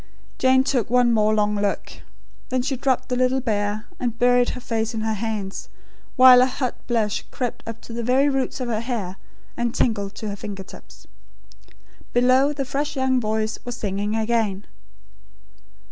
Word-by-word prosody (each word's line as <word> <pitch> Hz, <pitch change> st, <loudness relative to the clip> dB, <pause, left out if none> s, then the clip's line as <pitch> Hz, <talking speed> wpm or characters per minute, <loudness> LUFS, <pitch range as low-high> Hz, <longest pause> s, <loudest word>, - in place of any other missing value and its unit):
Jane 260 Hz, 0 st, +4 dB
took 250 Hz, -6 st, 0 dB
one 245 Hz, -1 st, +4 dB
more 215 Hz, -1 st, +3 dB
long 210 Hz, 0 st, +2 dB
look. 200 Hz, -1 st, -3 dB, 0.5 s
Then 255 Hz, -1 st, 0 dB
she 270 Hz, +1 st, -1 dB
dropped 260 Hz, 0 st, 0 dB
the 250 Hz, -, 0 dB
little 255 Hz, +1 st, +2 dB
bear, 210 Hz, -3 st, -1 dB
and 240 Hz, -2 st, -2 dB
buried 245 Hz, 0 st, +4 dB
her -, -, -5 dB
face 225 Hz, -1 st, -2 dB
in 220 Hz, -, -2 dB
her 220 Hz, 0 st, 0 dB
hands; 210 Hz, -2 st, -4 dB, 0.5 s
while 255 Hz, -1 st, +9 dB
a 255 Hz, -, +4 dB
hot 255 Hz, -1 st, -2 dB
blush 220 Hz, -4 st, 0 dB
crept 245 Hz, -3 st, -4 dB
up 230 Hz, 0 st, -7 dB
to 230 Hz, -, -10 dB
the 235 Hz, -, -3 dB
very 255 Hz, +4 st, +3 dB
roots 270 Hz, -2 st, -1 dB
of 255 Hz, -, -3 dB
her 225 Hz, -2 st, -1 dB
hair, 220 Hz, -7 st, -4 dB, 0.4 s
and 240 Hz, 0 st, -2 dB
tingled 205 Hz, -3 st, 0 dB
to 215 Hz, -, -5 dB
her 200 Hz, -, -4 dB
finger 200 Hz, -1 st, -7 dB
tips. -, -, -15 dB, 1.1 s
Below, 255 Hz, +3 st, +4 dB
the 280 Hz, -2 st, -3 dB
fresh 285 Hz, +3 st, -2 dB
young 260 Hz, -1 st, +2 dB
voice 220 Hz, 0 st, -1 dB
was 245 Hz, -1 st, -6 dB
singing 205 Hz, 0 st, -2 dB
again. 220 Hz, -3 st, 0 dB
235 Hz, 175 wpm, -23 LUFS, 215-255 Hz, 1.1 s, while